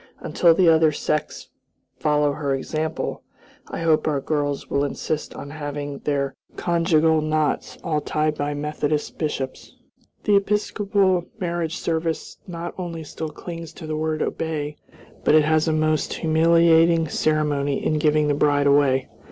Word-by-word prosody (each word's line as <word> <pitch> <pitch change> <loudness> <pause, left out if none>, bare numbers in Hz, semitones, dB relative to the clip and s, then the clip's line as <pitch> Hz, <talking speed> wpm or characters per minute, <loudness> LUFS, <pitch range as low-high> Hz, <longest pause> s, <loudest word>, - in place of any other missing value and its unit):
Until 170 -2 +3
the 180 0 +4
other 160 -1 +5
sects 150 0 -3 0.5
follow 150 -1 +2
her 140 -1 -1
example, 155 +4 -3 0.5
I - - -5
hope 160 -2 +2
our 145 -3 +1
girls 145 0 -2
will 140 - 0
insist 150 +2 -3
on 140 0 -8
having 145 -2 -5
their 140 -2 -1 0.2
conjugal 165 -2 +2
knots 155 -1 -1
all 155 -3 0
tied 155 +1 0
by 145 0 -3
Methodist 150 0 -2
bishops. 135 -4 -4 0.5
The 205 -1 +4
Episcopal 200 -2 +1
marriage 170 -3 -2
service 165 -1 -2
not 170 -1 -5
only 170 -3 -5
still 155 +1 -6
clings 165 +1 -8
to 165 - -9
the 155 0 -3
word 155 0 -1
"obey," 150 -2 -3 0.5
but - - +4
it 155 -1 +5
has 155 +1 +2
a - - +2
most 155 -1 +1
humiliating 165 0 +4
ceremony 145 -2 0
in 155 - +1
giving 150 0 +3
the 145 - +2
bride 145 0 +2
away. 140 -2 +3
155 Hz, 145 wpm, -23 LUFS, 145-165 Hz, 0.5 s, other